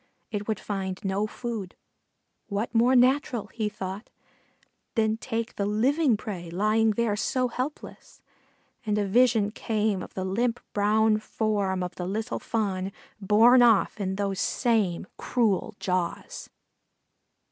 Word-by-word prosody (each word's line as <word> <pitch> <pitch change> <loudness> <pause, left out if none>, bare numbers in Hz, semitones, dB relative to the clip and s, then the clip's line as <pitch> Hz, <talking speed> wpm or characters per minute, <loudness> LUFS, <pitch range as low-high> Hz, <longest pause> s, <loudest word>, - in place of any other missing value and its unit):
It 205 -1 -4
would 220 - -1
find 190 -2 -4
no 195 +2 0
food; 220 -5 -5 0.7
what 205 +3 -3
more 240 +3 +4
natural, 250 -3 +3
he 215 -2 -1
thought, 195 +1 -6 0.9
than 220 -1 +2
take 225 0 -4
the 200 - 0
living 250 +4 +2
prey 185 -5 -6
lying 215 +5 +2
there 225 -1 0
so 250 +4 0
helpless? 255 +5 -6 0.6
And 210 -2 0
a 205 - +1
vision 220 0 +3
came 215 -3 -1
of - - -10
the 190 - -2
limp 230 +5 0
brown 215 +1 +3
form 205 -4 -1
of 180 0 -4
the 180 - -3
little 220 +5 -3
Fawn, 195 -4 -2 0.3
borne 225 +5 +6
off 225 -3 +4
in 190 -1 -2
those 195 -1 -2
same 215 -9 +1
cruel 220 -3 0
jaws. 180 -3 -3
215 Hz, 135 wpm, -27 LUFS, 195-230 Hz, 0.9 s, borne